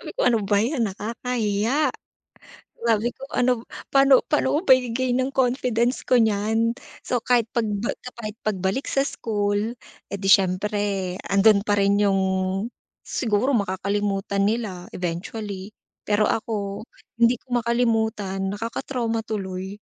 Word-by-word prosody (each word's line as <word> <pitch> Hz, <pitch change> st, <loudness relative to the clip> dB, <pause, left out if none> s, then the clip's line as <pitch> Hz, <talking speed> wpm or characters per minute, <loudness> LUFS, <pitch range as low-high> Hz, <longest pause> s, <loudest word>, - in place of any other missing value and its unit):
ko, -, -, -12 dB
"Ano 230 Hz, -2 st, +4 dB
ba 205 Hz, 0 st, +3 dB
'yan 240 Hz, -3 st, 0 dB
nakakahiya," 225 Hz, +4 st, -1 dB, 1.0 s
sabi 230 Hz, +1 st, +2 dB
ko," 265 Hz, -, -14 dB
ano 250 Hz, 0 st, +3 dB
b -, -, -10 dB, 0.3 s
pa'no 275 Hz, -1 st, +6 dB
pa'no 300 Hz, -, +2 dB
ko -, -, +3 dB
ba 270 Hz, -, +3 dB
i-gain 250 Hz, +1 st, -1 dB
'yung 260 Hz, +1 st, -2 dB
confidence 245 Hz, -1 st, +1 dB
ko 255 Hz, -, +4 dB
niyan." 220 Hz, 0 st, +2 dB, 0.3 s
So, 245 Hz, -, 0 dB
kahit 235 Hz, -2 st, +1 dB
pag 230 Hz, -2 st, 0 dB, 0.2 s
ba -, -, 0 dB, 0.2 s
kahit 220 Hz, -1 st, -7 dB
pagbalik 195 Hz, +5 st, -1 dB
sa 275 Hz, -, +1 dB
school, 210 Hz, -2 st, -1 dB, 0.3 s
eh, -, -, -5 dB
di 195 Hz, 0 st, +1 dB
siyempre 195 Hz, 0 st, +2 dB
ando'n 200 Hz, +1 st, +5 dB
pa 205 Hz, -, +3 dB
rin 200 Hz, 0 st, +3 dB
'yung 195 Hz, -2 st, +3 dB, 0.8 s
siguro 235 Hz, +2 st, 0 dB
makakalimutan 200 Hz, -1 st, 0 dB
nila 205 Hz, -5 st, -3 dB
eventually, 190 Hz, +3 st, -5 dB, 0.3 s
pero 210 Hz, 0 st, +3 dB
ako, 210 Hz, -1 st, -3 dB, 0.3 s
hindi 235 Hz, +1 st, +5 dB
ko 245 Hz, -1 st, 0 dB
makalimutan 220 Hz, -4 st, 0 dB, 0.2 s
nakaka-trauma 230 Hz, +1 st, -2 dB
tuloy. 190 Hz, -2 st, -4 dB
220 Hz, 135 wpm, -24 LUFS, 200-240 Hz, 1.0 s, pa'no